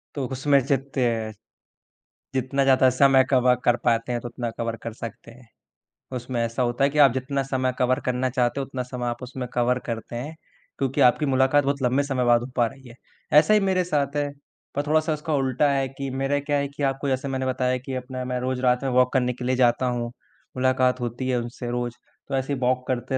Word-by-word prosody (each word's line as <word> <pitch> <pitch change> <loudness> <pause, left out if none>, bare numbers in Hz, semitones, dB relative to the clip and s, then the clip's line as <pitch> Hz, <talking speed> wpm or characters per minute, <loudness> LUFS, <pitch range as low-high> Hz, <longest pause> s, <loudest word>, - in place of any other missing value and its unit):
तो 140 - -2
उसमें 140 +2 +3
जीत्ते 135 -1 0 1.3
जितना 135 +1 0
ज़्यादा 130 -1 +5
समय 135 +1 +5
कवर 125 -2 +4
कर 120 - +5
पाते 115 0 +1
हैं 120 -1 -2
तो 120 - -6
उतना 120 0 -4
कवर 115 -1 -2
कर 115 - -5
सकते 115 0 -9
हैं। 125 0 -17 0.7
उसमें 120 0 -3
ऐसा 115 +2 -2
होता 120 +2 0
है 140 - +4
कि 150 - -5
आप 140 -3 +7
जितना 135 +1 -2
समय 130 -1 -1
कवर 130 0 +2
करना 125 0 0
चाहते 125 +1 0
हो 135 - -2
उतना 130 -2 -4
समय 125 0 -5
आप 120 +1 -3
उसमें 125 0 -5
कवर 125 +1 +1
करते 115 0 -5
हैं, 145 +7 -5 0.4
क्योंकि 135 -1 0
आपकी 125 +4 +4
मुलाकात 135 +1 +3
बहुत 140 0 -1
लंबे 130 +3 +2
समय 135 -3 -1
बाद 120 -1 +4
हो 120 - -5
पा 120 - +3
रही 135 +2 -13
है। 115 - -13 0.4
ऐसा 185 +7 +3
ही 210 - +6
मेरे 190 -2 +1
साथ 145 -4 -1
है, 145 -1 0 0.5
पर 145 - 0
थोड़ा-सा 155 +1 +2
उसका 155 +1 -3
उल्टा 135 +1 +2
है 135 -1 +1
कि 135 +1 -6
मेरा 140 +1 +1
क्या 145 0 -1
है 140 - 0
कि 140 +1 -7
आपको 135 +1 -1
जैसे 130 +1 -1
मैंने 130 -1 -2
बताया 130 0 0
कि 135 - -5
अपना 130 0 -5
मैं 125 0 -2
रोज़ 130 0 -2
रात 125 0 +2
में 135 - 0
वॉक 125 +1 +3
करने 125 -1 +1
के 125 0 -7
लिए 130 - +1
जाता 125 0 +3
हूँ। 120 -1 -2 0.5
मुलाकात 130 0 +2
होती 120 +2 -3
है 125 - +1
उनसे 120 +1 -6
रोज़ 120 -1 -2 0.4
तो 135 - -1
ऐसे 135 +2 -1
वॉक 125 0 0
करते 130 +1 -1
130 Hz, 225 wpm, -24 LUFS, 125-140 Hz, 1.3 s, आप